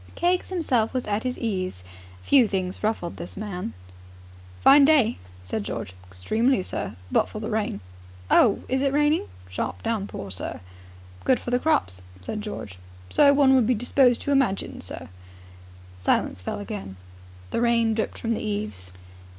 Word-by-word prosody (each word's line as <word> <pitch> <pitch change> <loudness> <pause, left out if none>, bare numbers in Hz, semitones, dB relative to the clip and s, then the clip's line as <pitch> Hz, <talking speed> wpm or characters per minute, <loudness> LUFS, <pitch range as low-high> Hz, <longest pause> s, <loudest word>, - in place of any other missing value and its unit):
Keggs 355 +1 +1
himself 260 -11 0
was 255 - -1
at 210 0 -1
his 255 0 -3
ease. 185 - -3 0.4
Few 265 -5 +5
things 185 -2 -3
ruffled 210 -5 -2
this 175 - -8
man. 185 - -4 0.9
"Fine 280 - +7
day," 275 -7 +4 0.2
said 100 +3 -3
George. 95 - -5
"Extremely, 215 - +1
sir, - - -4 0.2
but - - +2
for 215 - -6
the 215 +1 -4
rain." 210 - -1 0.5
"Oh, 220 - +5
is 260 +1 0
it 275 -1 +1
raining?" 295 +2 +2 0.2
"Sharp 90 0 -4
downpour, 200 - -3
sir." 90 -2 -5 0.6
"Good 260 - +3
for 240 - -6
the 245 - +3
crops," 265 - +1 0.2
said 210 - -4
George. 105 - -7 0.3
"So 280 - +6
one 280 -1 +5
would 255 -4 +4
be 250 - +3
disposed 245 +2 +3
to 285 - -2
imagine, 265 -9 0
sir." - - -6 0.9
Silence 90 0 0
fell 90 - -4
again. 205 - -6 0.6
The - - 0
rain 230 -1 +3
dripped 220 0 -2
from 230 - -3
the 225 - -1
eaves. 205 - -4
220 Hz, 160 wpm, -25 LUFS, 185-260 Hz, 0.9 s, Fine